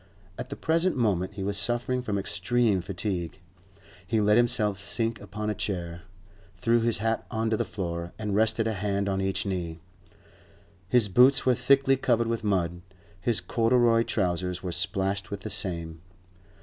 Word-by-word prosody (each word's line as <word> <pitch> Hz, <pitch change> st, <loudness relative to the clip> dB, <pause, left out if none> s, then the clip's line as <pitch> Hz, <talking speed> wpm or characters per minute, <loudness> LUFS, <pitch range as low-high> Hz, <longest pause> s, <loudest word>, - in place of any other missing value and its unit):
At 125 Hz, -, -7 dB
the 140 Hz, -, -5 dB
present 165 Hz, +2 st, +1 dB
moment 100 Hz, -5 st, 0 dB
he 100 Hz, -, -4 dB
was 100 Hz, +1 st, -1 dB
suffering 120 Hz, +4 st, 0 dB
from 105 Hz, -5 st, -2 dB
extreme 100 Hz, +1 st, +1 dB
fatigue; 90 Hz, -1 st, -4 dB, 0.7 s
he 110 Hz, +3 st, +1 dB
let 105 Hz, 0 st, +4 dB
himself 115 Hz, -4 st, +2 dB
sink 115 Hz, +3 st, -2 dB
upon 105 Hz, +1 st, -5 dB
a -, -, 0 dB
chair, 85 Hz, -5 st, -4 dB, 0.6 s
threw 115 Hz, +5 st, +2 dB
his 115 Hz, 0 st, +2 dB
hat 115 Hz, +2 st, -1 dB
on 110 Hz, -1 st, -1 dB
to -, -, +3 dB
the -, -, +1 dB
floor, 85 Hz, -3 st, -4 dB
and 105 Hz, -2 st, -2 dB
rested 110 Hz, +1 st, +2 dB
a 110 Hz, -, 0 dB
hand 100 Hz, 0 st, -1 dB
on 95 Hz, -1 st, 0 dB
each 95 Hz, 0 st, -1 dB
knee. 85 Hz, -4 st, -3 dB, 1.1 s
His 120 Hz, -2 st, +4 dB
boots 125 Hz, +7 st, +5 dB
were 130 Hz, -, +5 dB
thickly 135 Hz, +2 st, +3 dB
covered 120 Hz, -3 st, +2 dB
with 115 Hz, -1 st, -2 dB
mud; 90 Hz, -4 st, 0 dB, 0.4 s
his 115 Hz, +3 st, +1 dB
corduroy 115 Hz, 0 st, +3 dB
trousers 90 Hz, -4 st, -1 dB
were 90 Hz, -, -3 dB
splashed 95 Hz, +1 st, -2 dB
with 100 Hz, 0 st, -5 dB
the 110 Hz, -, -5 dB
same. 85 Hz, -4 st, -4 dB
105 Hz, 165 wpm, -27 LUFS, 95-115 Hz, 1.1 s, boots